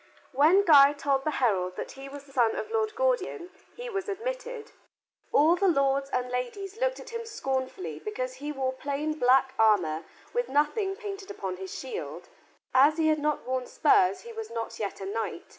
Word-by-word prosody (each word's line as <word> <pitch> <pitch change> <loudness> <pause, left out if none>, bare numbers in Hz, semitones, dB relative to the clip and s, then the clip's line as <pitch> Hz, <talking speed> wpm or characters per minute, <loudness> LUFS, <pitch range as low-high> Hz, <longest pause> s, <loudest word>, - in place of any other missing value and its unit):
When 315 +9 +5
Guy 285 -4 +8
told 275 -1 0
the - - +2
herald 185 -7 +1
that - - -5
he 270 0 -10
was 285 0 -9
the 280 - -19
son 240 -4 +2
of 435 - -5
Lord 435 -1 0
Gordian 485 -7 -1 0.2
he - - -7
was 390 -4 -3
admitted. 485 +2 -5 0.6
All 315 +4 +5
the 390 +2 +1
lords 275 -4 +2
and 250 -2 -2
ladies 385 - -4
looked - - +1
at - - -10
him 465 0 -4
scornfully 260 - -4
because 255 +8 -4
he 290 +3 -5
wore 265 -2 -2
plain 285 +3 -2
black 260 +1 +4
armor 180 -8 +3 0.3
with 485 0 -1
nothing 345 - +1
painted 400 -1 -7
upon 190 - -5
his 190 0 -7
shield. 455 -2 -6 0.4
As 285 +4 +5
he 315 -1 +3
had 310 -1 +2
not 300 0 -1
worn 255 0 -2
spurs, 405 -6 +3
he 470 0 -10
was 445 -1 -6
not 230 -1 -5
yet 205 -2 -4
a - - -4
knight. 225 - -4
290 Hz, 190 wpm, -28 LUFS, 255-405 Hz, 0.6 s, Guy